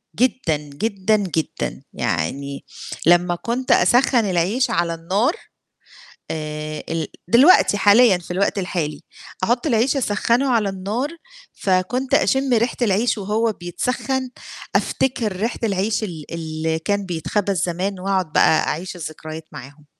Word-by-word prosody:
جدًا، 240 Hz, -10 st, +1 dB
جدًا، 190 Hz, +8 st, -1 dB
جدًا، 180 Hz, -6 st, -3 dB
يعني 140 Hz, -, -3 dB, 0.4 s
لمّا 175 Hz, +1 st, +4 dB
كنت 240 Hz, +7 st, -2 dB
أسَخّن 245 Hz, -2 st, +4 dB
العيش 195 Hz, +9 st, +1 dB
على 170 Hz, -6 st, 0 dB
النار 195 Hz, -, 0 dB, 1.0 s
آآ 155 Hz, -1 st, -5 dB
ال 165 Hz, -2 st, -2 dB, 0.2 s
دلوقتي 245 Hz, -, +6 dB
حاليًا 205 Hz, 0 st, +6 dB
في 175 Hz, -, -10 dB
الوقت 195 Hz, +3 st, 0 dB
الحالي، 165 Hz, -5 st, -3 dB, 0.4 s
أحُط 240 Hz, +8 st, +1 dB
العيش 245 Hz, +3 st, +2 dB
أسَخّنه 240 Hz, +2 st, +1 dB
على 225 Hz, -5 st, +2 dB
النار، 205 Hz, +9 st, -3 dB, 0.4 s
فكنت 195 Hz, +8 st, -1 dB
أشِم 265 Hz, -1 st, +3 dB
ريحة 235 Hz, +1 st, +1 dB
العيش 220 Hz, +2 st, +2 dB
وهو 215 Hz, +3 st, 0 dB
بيتسخَّن، 250 Hz, +8 st, -3 dB, 0.5 s
أفتكر 230 Hz, -7 st, 0 dB
ريحة 225 Hz, +5 st, -2 dB
العيش 205 Hz, +1 st, 0 dB
ال 165 Hz, -7 st, -6 dB
اللي 160 Hz, -1 st, -2 dB
كان 200 Hz, +4 st, -1 dB
بيتخبز 185 Hz, +1 st, -1 dB
زمان 185 Hz, +3 st, -2 dB
وأقعُد 185 Hz, -4 st, -1 dB
بقى 155 Hz, -, +4 dB
أعيش 180 Hz, +4 st, -3 dB
الذكريات 155 Hz, -1 st, -7 dB
معاهم. 145 Hz, +4 st, -11 dB
195 Hz, 125 wpm, -21 LUFS, 165-230 Hz, 1.0 s, دلوقتي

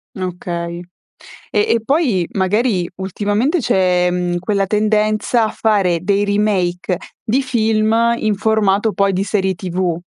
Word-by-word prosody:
Okay. 175 Hz, -2 st, -4 dB, 0.7 s
E -, -, +1 dB
e 230 Hz, -, +2 dB
poi 250 Hz, -, +1 dB
magari 195 Hz, -1 st, 0 dB
ultimamente 205 Hz, -, -1 dB
c'è, 180 Hz, -, +2 dB
mhmm, 175 Hz, -1 st, -1 dB
quella 195 Hz, +2 st, 0 dB
tendenza 215 Hz, +2 st, +1 dB
a 215 Hz, -, -1 dB
fare 195 Hz, -6 st, +1 dB
dei 200 Hz, +2 st, +1 dB
remake 195 Hz, -3 st, 0 dB, 0.3 s
di 255 Hz, +5 st, 0 dB
film 220 Hz, -3 st, +1 dB, 0.2 s
in 215 Hz, -2 st, 0 dB
formato 210 Hz, 0 st, +1 dB
poi 200 Hz, 0 st, +1 dB
di 190 Hz, +1 st, 0 dB
serie 190 Hz, -2 st, 0 dB
TV. 180 Hz, -1 st, -2 dB
200 Hz, 130 wpm, -17 LUFS, 180-215 Hz, 0.7 s, e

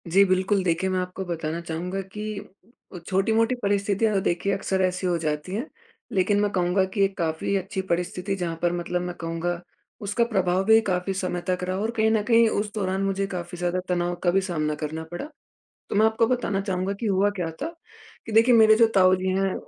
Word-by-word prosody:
जी, 190 Hz, +4 st, +5 dB
बिल्कुल, 190 Hz, +1 st, +1 dB
देखिए 180 Hz, +1 st, 0 dB
मैं 185 Hz, 0 st, 0 dB
आपको 180 Hz, +1 st, -4 dB
बताना 165 Hz, -2 st, -3 dB
चाहूँगा 175 Hz, +3 st, -4 dB
कि 210 Hz, -1 st, -4 dB, 0.5 s
उ 180 Hz, -, -7 dB
छोटी-मोटी 225 Hz, +5 st, +2 dB
परिस्थितियाँ 205 Hz, -1 st, +1 dB
तो 195 Hz, -, +2 dB
देखिए 185 Hz, +3 st, 0 dB
अक्सर 190 Hz, -1 st, -1 dB
ऐसी 185 Hz, 0 st, 0 dB
हो 175 Hz, -1 st, +1 dB
जाती 155 Hz, +1 st, -3 dB
हैं। 235 Hz, +6 st, -2 dB, 0.5 s
लेकिन 200 Hz, +2 st, +2 dB
मैं 205 Hz, -, +2 dB
कहूँगा 180 Hz, 0 st, +2 dB
कि 200 Hz, -, 0 dB
ये 195 Hz, -, +6 dB
काफ़ी 165 Hz, +2 st, -1 dB
अच्छी 195 Hz, +1 st, -3 dB
परिस्थिति 180 Hz, +3 st, -1 dB
जहाँ 175 Hz, -3 st, -3 dB
पर 175 Hz, 0 st, +2 dB
मतलब 175 Hz, +1 st, -2 dB
मैं 180 Hz, 0 st, -4 dB
कहूँगा, 170 Hz, +1 st, -3 dB, 0.4 s
उसका 210 Hz, +3 st, +1 dB
प्रभाव 190 Hz, -5 st, +1 dB
भी 220 Hz, +1 st, +7 dB
काफ़ी 185 Hz, -2 st, -1 dB
समय 185 Hz, -2 st, -2 dB
तक 180 Hz, 0 st, 0 dB
रहा 185 Hz, +1 st, -2 dB
और 220 Hz, +3 st, -1 dB
कहीं 220 Hz, 0 st, +3 dB
न 220 Hz, -1 st, +2 dB
कहीं 230 Hz, -1 st, +5 dB
उस 210 Hz, -1 st, -2 dB
दौरान 190 Hz, -2 st, -1 dB
मुझे 195 Hz, 0 st, 0 dB
काफ़ी 175 Hz, -2 st, -6 dB
ज़्यादा 175 Hz, +1 st, -1 dB
तनाव 175 Hz, 0 st, 0 dB
का 175 Hz, -, +3 dB
भी 195 Hz, +2 st, +3 dB
सामना 155 Hz, -5 st, -2 dB
करना 155 Hz, +1 st, -4 dB
पड़ा। 175 Hz, +11 st, -5 dB, 0.6 s
तो -, -, -3 dB
मैं 215 Hz, +2 st, +5 dB
आपको 220 Hz, +1 st, +2 dB
बताना 235 Hz, -5 st, 0 dB
चाहूँगा 190 Hz, 0 st, -2 dB
कि 235 Hz, -, -3 dB
हुआ 200 Hz, 0 st, +3 dB
क्या 180 Hz, -5 st, -3 dB
था 305 Hz, -, -1 dB, 0.6 s
कि 225 Hz, -, -7 dB
देखिए 230 Hz, +3 st, +5 dB
मेरे 220 Hz, -1 st, +7 dB
जो 230 Hz, +1 st, +5 dB
ताऊ 185 Hz, -1 st, +6 dB
जी 185 Hz, 0 st, -3 dB
हैं, 195 Hz, -1 st, +1 dB
190 Hz, 210 wpm, -25 LUFS, 175-205 Hz, 0.6 s, भी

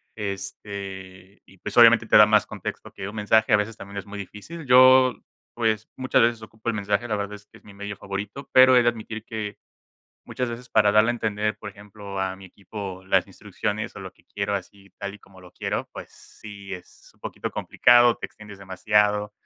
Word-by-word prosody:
Este, 100 Hz, -2 st, -7 dB
y 95 Hz, -, -20 dB
pues -, -, -7 dB
obviamente 115 Hz, -1 st, +7 dB
te -, -, +2 dB
da 105 Hz, -, +10 dB
más 105 Hz, 0 st, +3 dB
contexto -, -, -7 dB
que 95 Hz, -, -6 dB
un 105 Hz, -, -10 dB
mensaje, 110 Hz, +1 st, +2 dB
a 105 Hz, -, +7 dB
veces 105 Hz, +2 st, -3 dB
también 100 Hz, -1 st, -10 dB
es 100 Hz, -, -5 dB
muy 105 Hz, 0 st, -9 dB
difícil. 105 Hz, -, -9 dB
Yo, 130 Hz, 0 st, +6 dB, 0.4 s
pues, 110 Hz, -2 st, 0 dB
muchas 130 Hz, -2 st, +2 dB
veces 115 Hz, -1 st, +1 dB
ocupo 110 Hz, +1 st, -7 dB
el -, -, 0 dB
mensaje. 105 Hz, +3 st, -1 dB
La 105 Hz, -, -1 dB
verdad 100 Hz, 0 st, -4 dB
es 100 Hz, 0 st, -15 dB
que -, -, -19 dB
es -, -, -34 dB
mi 100 Hz, -1 st, -15 dB
medio 100 Hz, 0 st, -6 dB
favorito, 100 Hz, +8 st, -7 dB
pero 130 Hz, 0 st, +7 dB
he 125 Hz, -, +6 dB
de 120 Hz, -, +4 dB
admitir 110 Hz, -1 st, -7 dB
que, 110 Hz, -3 st, -6 dB, 0.7 s
muchas 125 Hz, -2 st, -3 dB
veces, 125 Hz, +2 st, -8 dB
para 105 Hz, -2 st, +3 dB
darle 110 Hz, +2 st, +5 dB
a -, -, +1 dB
entender, 105 Hz, -2 st, -2 dB
por 105 Hz, -1 st, -8 dB
ejemplo, 100 Hz, -1 st, -9 dB
a 95 Hz, 0 st, -2 dB
mi 95 Hz, -, -14 dB
equipo 95 Hz, 0 st, -8 dB
las 95 Hz, -2 st, +2 dB
instrucciones 105 Hz, +2 st, -5 dB
o -, -, -7 dB
lo 95 Hz, -1 st, -9 dB
que -, -, -29 dB
quiero 100 Hz, 0 st, -3 dB
así 100 Hz, +1 st, -8 dB
tal 100 Hz, 0 st, -5 dB
y -, -, -13 dB
como 95 Hz, -2 st, -19 dB
lo 90 Hz, -1 st, -15 dB
quiero, -, -, -4 dB
pues -, -, -9 dB
sí 100 Hz, -2 st, -11 dB
es 90 Hz, -, -15 dB
un -, -, -32 dB
poquito -, -, -5 dB
complicado, 120 Hz, -1 st, +4 dB
te -, -, -5 dB
extiendes 105 Hz, -2 st, -14 dB
demasiado, 105 Hz, +2 st, +1 dB
105 Hz, 215 wpm, -24 LUFS, 100-110 Hz, 0.7 s, da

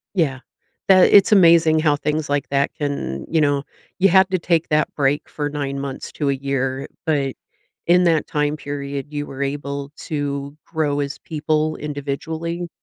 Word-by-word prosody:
Yeah, 140 Hz, -7 st, +1 dB, 0.5 s
that 185 Hz, -1 st, +6 dB
it's 200 Hz, +1 st, +6 dB
amazing 165 Hz, -4 st, +6 dB
how 150 Hz, -2 st, +3 dB
things 150 Hz, +1 st, -2 dB
like 145 Hz, 0 st, -1 dB
that 140 Hz, 0 st, +1 dB
can, 140 Hz, -, -3 dB
you 160 Hz, -1 st, +2 dB
know 145 Hz, -1 st, +1 dB, 0.3 s
you 195 Hz, +1 st, +5 dB
have 190 Hz, +1 st, +5 dB
to 185 Hz, -, 0 dB
take 170 Hz, -1 st, +1 dB
that 150 Hz, 0 st, +1 dB
break 145 Hz, 0 st, 0 dB
for 145 Hz, -1 st, -3 dB
9 140 Hz, -2 st, -3 dB
months 135 Hz, -1 st, -6 dB
to 145 Hz, -2 st, -1 dB
a -, -, +1 dB
year, 135 Hz, -1 st, -2 dB, 0.2 s
but 140 Hz, -4 st, 0 dB, 0.5 s
in 180 Hz, +1 st, +5 dB
that 165 Hz, -3 st, +2 dB
time 150 Hz, 0 st, -1 dB
period, 140 Hz, -1 st, -5 dB
you 145 Hz, -1 st, -4 dB
were 135 Hz, +1 st, -6 dB
able 140 Hz, 0 st, -3 dB
to 145 Hz, -2 st, -4 dB
grow 150 Hz, -3 st, -1 dB
as 140 Hz, 0 st, -4 dB
people 155 Hz, 0 st, -1 dB
individually. 160 Hz, +4 st, -4 dB
145 Hz, 170 wpm, -21 LUFS, 140-160 Hz, 0.5 s, that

